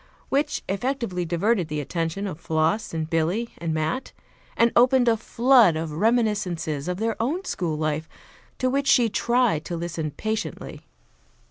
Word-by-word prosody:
Which 290 Hz, +2 st, 0 dB
effectually 200 Hz, -4 st, -2 dB
diverted 180 Hz, +2 st, +1 dB
the 150 Hz, -1 st, -3 dB
attention 165 Hz, +6 st, -3 dB
of 180 Hz, -5 st, -5 dB
Floss 160 Hz, +6 st, 0 dB
and 160 Hz, -1 st, -3 dB
Billy 170 Hz, +8 st, 0 dB
and 165 Hz, -1 st, -2 dB
Mat 155 Hz, +11 st, -2 dB, 0.4 s
and 230 Hz, 0 st, +4 dB
opened 250 Hz, +1 st, +5 dB
a 230 Hz, -, +5 dB
flood 235 Hz, -4 st, +4 dB
of 160 Hz, 0 st, -3 dB
reminiscences 180 Hz, -, 0 dB
of 180 Hz, 0 st, -2 dB
their 225 Hz, +2 st, -1 dB
own 325 Hz, +11 st, -1 dB
school 165 Hz, -4 st, -2 dB
life, 155 Hz, 0 st, -2 dB, 0.5 s
to 255 Hz, -, 0 dB
which 275 Hz, +2 st, 0 dB
she 245 Hz, -4 st, +5 dB
tried 235 Hz, -8 st, +1 dB
to 170 Hz, -, -4 dB
listen 165 Hz, -2 st, -3 dB
patiently. 220 Hz, +9 st, -4 dB
190 Hz, 150 wpm, -24 LUFS, 160-235 Hz, 0.5 s, opened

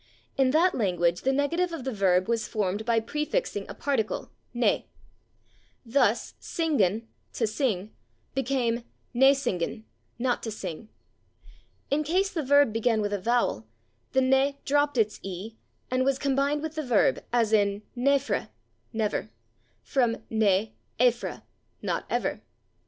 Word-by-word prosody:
In 265 Hz, -1 st, +3 dB
that 335 Hz, +6 st, +4 dB
language 175 Hz, -5 st, +1 dB
the 265 Hz, -, +2 dB
negative 335 Hz, +6 st, +1 dB
of 325 Hz, -6 st, -5 dB
the 265 Hz, 0 st, -3 dB
verb 185 Hz, -3 st, +2 dB
was 230 Hz, -1 st, 0 dB
formed 205 Hz, 0 st, -1 dB
by 230 Hz, -1 st, +3 dB
prefixing 300 Hz, -, -2 dB
a -, -, -7 dB
particle, 270 Hz, -7 st, -1 dB, 0.2 s
/ne/. 240 Hz, -, +2 dB, 1.0 s
Thus, 260 Hz, +4 st, +2 dB
/singan/ 230 Hz, -, +1 dB, 0.3 s
(=/to 230 Hz, -, +1 dB
sing/) 215 Hz, -4 st, -1 dB, 0.4 s
became 250 Hz, -3 st, 0 dB, 0.3 s
/ne 270 Hz, +3 st, +6 dB
singan/ 220 Hz, -5 st, -2 dB, 0.3 s
(=/not 245 Hz, +1 st, 0 dB
to 225 Hz, -, -4 dB
sing/). 205 Hz, 0 st, -6 dB, 1.0 s
In 295 Hz, +2 st, +2 dB
case 375 Hz, +6 st, +1 dB
the 325 Hz, -, -2 dB
verb 285 Hz, -4 st, +4 dB
began 225 Hz, 0 st, +2 dB
with 205 Hz, 0 st, -1 dB
a 205 Hz, -, 0 dB
vowel 225 Hz, -, +1 dB, 0.5 s
the 265 Hz, -, +4 dB
/ne/ 265 Hz, +2 st, +3 dB
dropped 290 Hz, -1 st, +2 dB
its 215 Hz, -2 st, +1 dB
/e/ 195 Hz, +4 st, -6 dB, 0.4 s
and 255 Hz, 0 st, +2 dB
was 270 Hz, 0 st, +2 dB
combined 280 Hz, +2 st, +1 dB
with 315 Hz, -1 st, -3 dB
the 315 Hz, -, -2 dB
verb, 245 Hz, -6 st, +2 dB
as 230 Hz, -2 st, +2 dB
in 205 Hz, -1 st, +2 dB
/naefre/ 270 Hz, -3 st, +1 dB, 0.4 s
(never), 215 Hz, -, -1 dB, 0.5 s
from 240 Hz, -4 st, +1 dB, 0.2 s
/ne 215 Hz, -1 st, +2 dB, 0.3 s
aefre/ 245 Hz, -1 st, +1 dB, 0.4 s
(=/not -, -, -1 dB
ever -, -, -1 dB
240 Hz, 140 wpm, -27 LUFS, 215-275 Hz, 1.0 s, ne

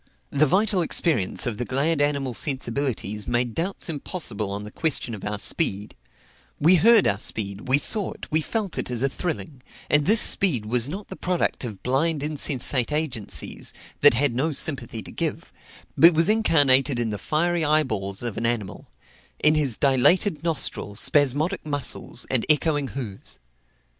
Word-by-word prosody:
The 145 Hz, +2 st, +2 dB
vital 195 Hz, +3 st, +1 dB
experience 155 Hz, -, 0 dB
of 120 Hz, -3 st, -3 dB
the -, -, -1 dB
glad 145 Hz, +5 st, 0 dB
animal 140 Hz, -3 st, -1 dB
sensibilities 120 Hz, -5 st, -2 dB
made 120 Hz, -1 st, -1 dB
doubts 185 Hz, -, -3 dB
impossible 145 Hz, -, -3 dB
on 100 Hz, +1 st, -4 dB
the 105 Hz, -, -9 dB
question 150 Hz, -6 st, -1 dB
of 105 Hz, -, -8 dB
our 105 Hz, 0 st, -2 dB
speed; 105 Hz, -, -1 dB, 0.6 s
we 170 Hz, +5 st, +5 dB
heard 225 Hz, +3 st, +5 dB
our 100 Hz, -, 0 dB
speed, 100 Hz, -1 st, -4 dB
we 130 Hz, +2 st, +4 dB
saw 205 Hz, +7 st, +3 dB
it, -, -, -10 dB
we 155 Hz, +1 st, +2 dB
felt 205 Hz, +2 st, -3 dB
it -, -, -3 dB
as 125 Hz, 0 st, -3 dB
a 135 Hz, -, +2 dB
thrilling; 155 Hz, -3 st, -5 dB, 0.3 s
and 145 Hz, +1 st, +3 dB
this 220 Hz, +2 st, +4 dB
speed 145 Hz, -, +2 dB
was 120 Hz, +3 st, +1 dB
not 195 Hz, +6 st, -7 dB
the 190 Hz, -, -7 dB
product 180 Hz, -6 st, -1 dB
of 110 Hz, -6 st, -8 dB
blind 145 Hz, +4 st, 0 dB
insensate 140 Hz, -4 st, 0 dB
agencies, 150 Hz, -9 st, -4 dB, 0.3 s
that 145 Hz, -4 st, +6 dB
had 135 Hz, 0 st, +1 dB
no 140 Hz, +7 st, -1 dB
sympathy 130 Hz, -7 st, -2 dB
to -, -, -11 dB
give, -, -, -4 dB, 0.4 s
but 170 Hz, 0 st, +6 dB
was 165 Hz, +3 st, +2 dB
incarnated 145 Hz, -, +3 dB
in 115 Hz, -2 st, -1 dB
the 105 Hz, -, -5 dB
fiery 170 Hz, -, 0 dB
eyeballs 115 Hz, -11 st, 0 dB
of 120 Hz, -4 st, -5 dB
an 115 Hz, -, -2 dB
animal, 110 Hz, -5 st, -4 dB, 0.5 s
in 155 Hz, -, +3 dB
his 145 Hz, -7 st, 0 dB
dilated 145 Hz, +6 st, +3 dB
nostril, 155 Hz, -10 st, 0 dB
spasmodic 145 Hz, -, +2 dB
muscles, 145 Hz, -4 st, -2 dB
and 130 Hz, -3 st, +1 dB
echoing 150 Hz, -2 st, +2 dB
hoofs. 105 Hz, -8 st, -6 dB
140 Hz, 165 wpm, -23 LUFS, 120-160 Hz, 0.6 s, that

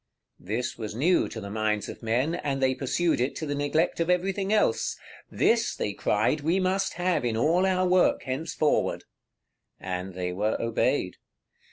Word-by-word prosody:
This 115 Hz, +6 st, -3 dB
was 110 Hz, -1 st, -5 dB
new 170 Hz, +9 st, +2 dB
to 110 Hz, -, -7 dB
the 100 Hz, -2 st, -7 dB
minds 105 Hz, -1 st, -1 dB
of -, -, -9 dB
men, 125 Hz, +7 st, 0 dB
and 145 Hz, -5 st, -2 dB
they 130 Hz, -1 st, +2 dB
pursued 135 Hz, +3 st, 0 dB
it 130 Hz, -, -1 dB
to 155 Hz, -, -4 dB
the 145 Hz, -, -2 dB
neglect 145 Hz, +5 st, 0 dB
of 165 Hz, +1 st, 0 dB
everything 190 Hz, +2 st, 0 dB
else. 215 Hz, -, +1 dB, 0.3 s
"This," 230 Hz, 0 st, +2 dB
they 105 Hz, -, -2 dB
cried, 110 Hz, +9 st, +1 dB
"we 165 Hz, +6 st, +1 dB
must 190 Hz, +1 st, 0 dB
have 180 Hz, -4 st, 0 dB
in 115 Hz, -2 st, 0 dB
all 170 Hz, +9 st, +3 dB
our 185 Hz, -1 st, +2 dB
work 180 Hz, 0 st, +3 dB
henceforward:" 145 Hz, +3 st, 0 dB, 0.8 s
and 90 Hz, 0 st, -5 dB
they 90 Hz, -1 st, -3 dB
were 105 Hz, +4 st, -1 dB
obeyed. 115 Hz, -1 st, 0 dB
145 Hz, 170 wpm, -27 LUFS, 110-180 Hz, 0.8 s, all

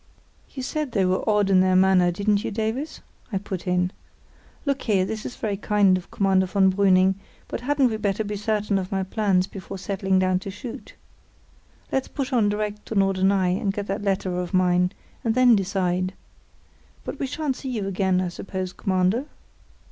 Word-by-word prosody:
"You 265 Hz, -, -7 dB
said 300 Hz, -1 st, -3 dB
they 195 Hz, -3 st, +2 dB
were 185 Hz, +1 st, +1 dB
odd 205 Hz, -2 st, +3 dB
in 185 Hz, -, +6 dB
their 185 Hz, 0 st, +3 dB
manner, 185 Hz, -1 st, +5 dB
didn't 200 Hz, +3 st, +1 dB
you, -, -, -2 dB
Davies?" 225 Hz, +8 st, -3 dB, 0.3 s
I 195 Hz, -, 0 dB
put 190 Hz, -2 st, -5 dB
in. 180 Hz, 0 st, +1 dB, 0.7 s
"Look 280 Hz, -1 st, 0 dB
here, 200 Hz, -5 st, +2 dB
this 215 Hz, +2 st, -4 dB
is 245 Hz, -, -8 dB
very 205 Hz, -3 st, -2 dB
kind 205 Hz, -2 st, +3 dB
of 185 Hz, -, -5 dB
Commander 190 Hz, -1 st, +2 dB
von 190 Hz, 0 st, +3 dB
Brüning; 190 Hz, -1 st, +4 dB, 0.3 s
but -, -, -5 dB
hadn't 270 Hz, -1 st, +2 dB
we 220 Hz, -, -2 dB
better 205 Hz, 0 st, -1 dB
be 210 Hz, 0 st, -4 dB
certain 210 Hz, -1 st, 0 dB
of 185 Hz, -1 st, -5 dB
my 190 Hz, -1 st, 0 dB
plans 190 Hz, -2 st, +1 dB
before 195 Hz, 0 st, -8 dB
settling 190 Hz, 0 st, 0 dB
down 185 Hz, 0 st, +2 dB
to 195 Hz, -, -7 dB
shoot? 225 Hz, +5 st, -8 dB, 1.0 s
Let's 265 Hz, -, 0 dB
push 275 Hz, -1 st, -4 dB
on 220 Hz, -4 st, +3 dB
direct 210 Hz, 0 st, -3 dB
to 225 Hz, -, -4 dB
Norderney 190 Hz, -1 st, +2 dB
and 200 Hz, -, +1 dB
get 205 Hz, 0 st, -4 dB
that 195 Hz, +1 st, -3 dB
letter 190 Hz, -2 st, -1 dB
of 180 Hz, +1 st, -3 dB
mine, 180 Hz, 0 st, +3 dB, 0.3 s
and 225 Hz, -1 st, +1 dB
then 250 Hz, -2 st, +6 dB
decide. 185 Hz, -1 st, -1 dB, 0.9 s
But -, -, -6 dB
we 275 Hz, -, -1 dB
shan't 280 Hz, -1 st, -2 dB
see 270 Hz, -, -6 dB
you 220 Hz, -6 st, -2 dB
again, 190 Hz, -1 st, +1 dB
I 180 Hz, -, -1 dB
suppose, 185 Hz, +1 st, -5 dB
Commander?" 190 Hz, +6 st, +1 dB
195 Hz, 185 wpm, -24 LUFS, 185-215 Hz, 1.0 s, in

